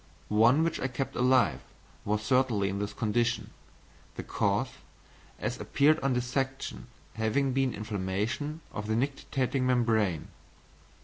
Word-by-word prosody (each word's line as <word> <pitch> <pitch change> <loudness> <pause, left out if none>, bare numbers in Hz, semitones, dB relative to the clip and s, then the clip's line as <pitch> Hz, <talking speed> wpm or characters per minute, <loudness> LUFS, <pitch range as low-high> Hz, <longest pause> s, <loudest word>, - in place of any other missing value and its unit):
One 115 +8 +5
which 165 - -1
I 135 - 0
kept 130 +1 -4
alive 125 - +3 0.5
was 105 +1 0
certainly 115 -4 +2
in 100 +1 -3
this 105 0 -2
condition, 120 +3 0 0.6
the - - -5
cause, - - 0 0.7
as - - -3
appeared 150 +3 +3
on 135 0 +1
dissection, 125 - -2 0.3
having 120 +5 +1
been 135 -1 +2
inflammation 105 - -3
of 105 0 -4
the 110 - +1
nictitating 135 0 -1
membrane. 110 - +1
120 Hz, 125 wpm, -29 LUFS, 105-135 Hz, 0.7 s, One